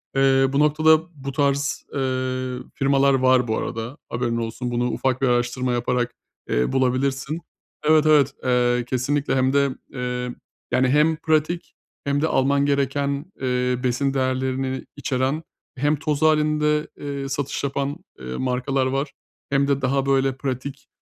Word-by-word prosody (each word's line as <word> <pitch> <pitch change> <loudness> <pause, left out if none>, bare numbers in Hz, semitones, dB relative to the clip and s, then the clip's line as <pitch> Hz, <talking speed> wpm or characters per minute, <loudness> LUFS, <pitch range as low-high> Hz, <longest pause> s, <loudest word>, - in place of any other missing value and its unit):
Eee, 135 0 +4
bu 140 - +2
noktada 155 +1 +5 0.2
bu 140 - -2
tarz, 140 0 0
eee, 130 -1 -1 0.2
firmalar 140 0 +3
var 130 -1 +3
bu 110 - 0
arada, 115 +4 -4
haberin 120 -1 -1
olsun. 115 +2 -3
Bunu 120 +1 0
ufak 130 -1 -1
bir 135 - +3
araştırma 120 +1 +1
yaparak, 120 0 0 0.4
eee, 60 - +1
bulabilirsin. 135 +3 0 0.5
Evet, 155 0 +5
evet, 145 -3 +5
eee, 125 -1 +2
kesinlikle. 135 +2 0
Hem 130 0 +2
de, 140 0 +3 0.2
eee, 125 -1 -3 0.4
yani, 130 0 +3
hem 150 +4 +4
pratik 160 +2 0 0.3
hem 140 0 +1
de 160 - +2
alman 140 0 +2
gereken, 140 +3 0
eee, 125 -1 0
besin 130 +2 0
değerlerini 130 0 -1
içeren, 135 +3 -1 0.3
hem 145 +4 +2
toz 150 0 -2
hâlinde, 150 0 +2
eee, 140 -1 -5
satış 140 0 -3
yapan, 140 +1 -2 0.2
eee, 65 0 -6
markalar 130 +1 0
var 135 +2 -1 0.4
hem 140 0 +2
de 140 -1 +1
daha, 135 +1 +1
böyle, 135 -1 +2
pratik, 135 0 -5
135 Hz, 145 wpm, -23 LUFS, 125-140 Hz, 0.5 s, noktada